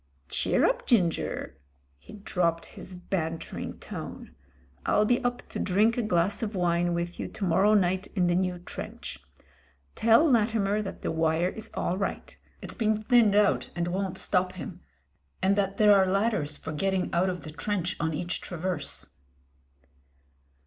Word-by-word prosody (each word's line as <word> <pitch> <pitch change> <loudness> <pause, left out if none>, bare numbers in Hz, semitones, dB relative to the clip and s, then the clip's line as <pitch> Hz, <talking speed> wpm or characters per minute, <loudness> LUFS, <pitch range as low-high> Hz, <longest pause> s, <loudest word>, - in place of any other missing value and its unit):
"Cheer - - +2
up, - - 0
Ginger." 170 - 0 0.4
He - - -14
dropped 175 -5 -1
his 185 - -9
bantering 165 -3 -4
tone. - - -8 0.5
"I'll 210 - +3
be 245 +3 +2
up 245 0 -2
to - - -5
drink 210 +5 +3
a 245 - 0
glass 200 -2 +1
of 220 -2 -3
wine 175 -1 +1
with 170 +1 -3
you - - -3
to 210 - -7
mor 180 0 +2
row 210 +2 +5
night 190 -1 +1
in 180 -3 +2
the 175 - +2
new 180 0 0
trench. 175 - -7 0.7
Tell 230 +8 +5
Latimer 215 -5 +2
that 195 - -7
the - - -1
wire 160 +2 +1
is 220 - -7
all 185 - -1
right 195 - -4
— - - -34
it's - - -6
been 215 -1 +1
thinned 225 -3 +5
out 205 -1 +3
and 175 0 -1
won't 190 0 -2
stop 185 -1 +1
him, 185 - -8 0.6
and 190 +1 +3
that 195 -1 0
there 210 -1 +7
are 190 -1 +4
ladders 195 -7 0
for 160 - -6
getting 190 +3 -1
out 180 +2 +2
of 180 -1 -4
the 155 - -8
trench 180 +3 -2
on 160 - 0
each 175 +3 -3
traverse." 175 -4 -4
190 Hz, 170 wpm, -28 LUFS, 175-210 Hz, 0.7 s, there